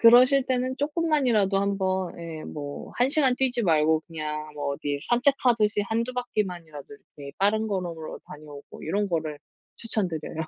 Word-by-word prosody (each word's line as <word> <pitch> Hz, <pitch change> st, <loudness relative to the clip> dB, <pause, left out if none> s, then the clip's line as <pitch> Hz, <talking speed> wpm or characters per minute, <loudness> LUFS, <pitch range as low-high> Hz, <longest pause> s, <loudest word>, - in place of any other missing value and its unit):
그러실 255 Hz, +3 st, +7 dB
때는 255 Hz, 0 st, 0 dB
조금만이라도 285 Hz, -, +2 dB
한번 190 Hz, -2 st, 0 dB
예 165 Hz, -2 st, -7 dB
뭐 145 Hz, -1 st, -7 dB
1 245 Hz, +2 st, +3 dB
시간 275 Hz, -3 st, +3 dB
뛰지 250 Hz, -2 st, +1 dB
말고 160 Hz, -3 st, +3 dB
그냥 155 Hz, -2 st, -5 dB
뭐 145 Hz, -1 st, -2 dB
어디 145 Hz, -1 st, -3 dB
산책하듯이 240 Hz, -4 st, +3 dB
1-2 230 Hz, +3 st, -1 dB
바퀴 245 Hz, -4 st, -1 dB
만이라도 165 Hz, -6 st, -9 dB, 0.3 s
이렇게 140 Hz, -1 st, -9 dB
빠른 215 Hz, +3 st, +2 dB
걸음으로 175 Hz, -6 st, -4 dB
다녀오고 150 Hz, -1 st, -11 dB
이런 200 Hz, +6 st, -1 dB
거를 155 Hz, -4 st, -2 dB, 0.4 s
추천드려요. 185 Hz, -9 st, -2 dB
195 Hz, 340 characters per minute, -26 LUFS, 155-245 Hz, 0.4 s, 그러실